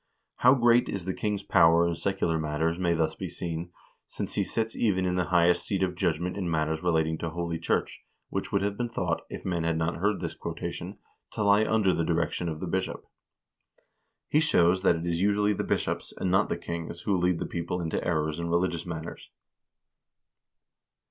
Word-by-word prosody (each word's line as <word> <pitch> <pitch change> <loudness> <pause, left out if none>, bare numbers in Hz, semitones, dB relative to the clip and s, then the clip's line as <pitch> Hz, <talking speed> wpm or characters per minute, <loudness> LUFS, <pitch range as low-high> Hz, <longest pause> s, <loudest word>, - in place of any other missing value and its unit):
How 125 +2 +6
great 120 -1 +4
is 95 -4 -4
the 95 - -1
king's 105 0 -2
power 85 0 +5
in 85 - 0
secular 85 -2 -1
matters 80 +2 -1
may 85 -2 +2
thus 80 -1 +1
be - - -6
seen, 85 0 -5 0.4
since - - -5
he - - +1
sits 115 0 -2
even 95 -5 +1
in 90 - 0
the 90 -1 +1
highest 90 0 +3
seat 95 -2 -1
of 90 -1 0
judgment 90 +1 -1
in 90 -3 -2
matters 80 0 0
relating 80 -2 +1
to 85 - -3
holy 85 0 -3
church, 85 - -1 0.3
which - - -3
would 100 -1 +1
have 100 0 -1
been 120 -1 -1
thought, 90 -7 -1
if - - -8
men 85 -3 -1
had 80 0 0
not 80 +1 -1
heard 100 +3 +1
this - - -4
quotation, - - -6 0.4
to 110 - -1
lie 100 +1 +5
under 110 -5 +2
the 85 - 0
direction 85 +1 0
of 80 -1 -5
the - - -2
bishop." 95 +2 -3 1.2
He 150 - +3
shows 95 - +3
that 95 - +4
it 85 +1 -4
is 85 0 -1
usually 105 +1 +3
the - - -2
bishops, - - -2
and 95 - -1
not 95 +2 +3
the - - -1
kings, 85 0 -6
who 100 - +1
lead 90 -1 +2
the - - -3
people 85 +1 -3
into 85 -2 -2
errors 80 -2 -1
in 85 0 -3
religious 85 0 0
matters. 80 -1 -7
85 Hz, 200 wpm, -28 LUFS, 85-95 Hz, 1.2 s, How